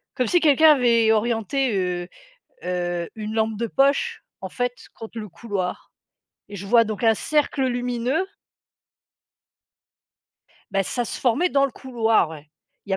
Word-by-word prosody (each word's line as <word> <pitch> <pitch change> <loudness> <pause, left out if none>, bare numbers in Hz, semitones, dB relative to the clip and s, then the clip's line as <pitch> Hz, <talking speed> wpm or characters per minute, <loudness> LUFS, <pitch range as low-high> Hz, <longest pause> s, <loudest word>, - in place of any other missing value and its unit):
comme 255 -2 +1
si 350 +9 +3
quelqu'un 310 0 +6
avait 235 -5 +4
orienté, 230 +3 0
heu 180 -1 -2 0.6
heu, 175 -1 -2
une 215 0 -5
lampe 220 -1 0
de 235 +2 -2
poche, 280 - +1 0.2
en 190 - -5
fait, 245 +4 -2 0.2
contre 225 0 -9
le 210 -2 -6
couloir 190 -1 -5 0.6
et 205 - -8
je 195 - -7
vois 230 +2 +5
donc 215 +1 -4
un 225 - +6
cercle 285 +1 0
lumineux. 245 +6 -1 2.5
Bah, 195 0 +1
ça 245 +5 -2
se - - -5
formait 265 +9 +2
dans 275 -3 +3
le 275 - -1
couloir, 225 - +1
ouais. 150 -1 -11 0.4
Il - - -11
y - - +2
a - - 0
230 Hz, 155 wpm, -23 LUFS, 205-265 Hz, 2.5 s, quelqu'un